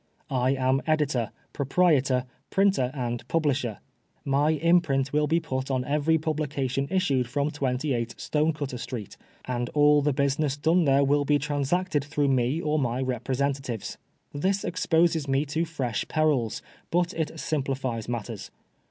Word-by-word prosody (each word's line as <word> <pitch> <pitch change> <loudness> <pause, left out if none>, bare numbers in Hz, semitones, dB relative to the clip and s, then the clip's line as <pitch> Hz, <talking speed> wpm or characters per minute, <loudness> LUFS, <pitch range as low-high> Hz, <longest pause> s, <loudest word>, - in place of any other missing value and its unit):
I 130 +1 +2
am 130 +1 +1
editor, 145 -7 +1 0.2
proprietor, 135 -4 +2 0.2
printer 195 -10 +2
and 120 -3 -3
publisher. 135 - 0 0.5
My 140 +2 +2
imprint 155 -4 +2
will 150 0 +2
be 165 +2 +2
put 130 -5 -4
on 130 -2 0
every 150 +3 +2
publication 145 -4 -2
issued 150 -10 +1
from 140 +3 0
28 125 -4 -1
Stonecutter 150 -4 -1
Street, 115 -4 -6 0.3
and 120 -1 -2
all 145 0 +5
the 145 +1 +2
busLness 140 +1 0
done 165 +3 +3
there 140 0 +4
will 145 +1 +3
be 145 +1 +3
transacted 145 +3 0
through 145 -1 0
me 130 +3 +1
or 155 -2 0
my 125 -2 -1
representatives. 130 -1 -2 0.3
This 190 +7 0
exposes 165 -3 +1
me 135 +2 +1
to 160 +3 -1
fresh 130 -9 -3
perils, 150 -8 0 0.3
but 175 +2 +1
it 160 0 -3
simplifies 130 -6 -2
matters. 120 -3 -5
140 Hz, 140 wpm, -26 LUFS, 130-155 Hz, 0.5 s, all